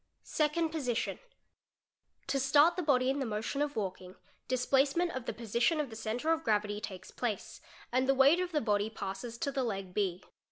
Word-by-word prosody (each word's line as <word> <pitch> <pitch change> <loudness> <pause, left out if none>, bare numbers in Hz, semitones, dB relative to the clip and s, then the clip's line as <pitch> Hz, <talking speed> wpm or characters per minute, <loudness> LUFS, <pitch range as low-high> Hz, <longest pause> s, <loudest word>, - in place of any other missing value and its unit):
_ - - -49 0.2
Second 315 +2 +1
Position—To 310 - -6
start 290 +6 +5
the 365 - -1
body 260 -5 +3
in 280 - -2
the 270 - -1
motion 220 +6 -2
of 290 0 -1
walking, 185 -3 -4 0.4
splacement 275 +7 +2
of 260 -5 -5
the - - 0
position 235 +7 0
of 285 -5 -2
the - - -7
centre 225 +8 -1
of 325 0 +1
gravity 210 -1 0
takes 190 -3 -7
place, 230 -5 -4 0.3
and 255 +2 +1
the 270 0 +3
eight 295 +6 +6
of 365 -1 -2
the 300 -3 +1
body 210 -1 +1
passes 220 +3 -6
to 280 - -2
the 270 - -1
leg 195 -5 -4
B. 190 -3 -1
255 Hz, 190 wpm, -32 LUFS, 215-295 Hz, 0.4 s, eight